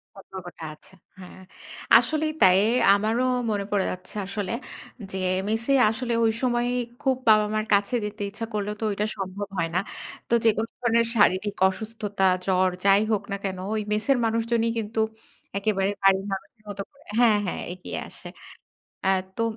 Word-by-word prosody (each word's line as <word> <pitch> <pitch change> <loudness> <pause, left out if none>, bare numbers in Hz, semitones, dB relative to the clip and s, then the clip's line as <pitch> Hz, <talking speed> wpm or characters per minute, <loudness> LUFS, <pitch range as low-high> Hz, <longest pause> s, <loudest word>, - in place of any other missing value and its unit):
সতর্কটা 185 -3 -10
আছে। 190 +5 -18 0.3
হ্যাঁ। 185 0 -12 0.6
আসলেই 310 0 0
তাই 185 -1 +7 0.4
আমারও 220 +5 +1 0.3
মনে 200 -1 -1
পড়ে 200 -2 +2
যাচ্ছে 185 +2 -9
আসলে 200 -1 -4 0.6
যে, 190 - -3 0.3
মেসে 225 +5 0 0.2
আসলে 235 +2 -2
ঐ - - +4 0.2
সময়েই 245 -1 +1 0.3
খুব 265 -1 +2
বাবা 215 -1 +6
মার 215 0 0
কাছে 200 +4 +2
যেতে 210 0 -6
ইচ্ছা 220 +3 -5
করলেও 210 0 -2
তো - - -2
ঐটা 205 +1 -1
সম্ভব 195 +1 -4
হয় 165 -1 0
না। - - +4 0.5
তো - - 0
যেকোন 220 0 +3
ধরনের 235 -1 +2
শারীরিক 205 -1 +3
অসুস্থতা, 205 -1 -3 0.2
জ্বর 185 -1 +3 0.2
যাই 195 +1 +6
হোক 210 - +1
না 200 - -1
কেন 190 -2 -3 0.2
ওই 220 - 0
মেসের 215 +6 +2
মানুষজনই 230 0 +1
কিন্তু 225 0 -3 0.6
একেবারে 195 -1 +1
বাড়ির 195 0 +4
মানুষের 205 +3 -8
মত 200 -1 -7
করে 280 +1 -23 0.2
হ্যাঁ, 230 -3 +5
হ্যাঁ 180 - -3
এগিয়ে 180 - -6
আসে। - - -8 0.8
অ্যা 190 - +3 0.3
তো 230 - +1
210 Hz, 160 wpm, -25 LUFS, 195-225 Hz, 0.8 s, তাই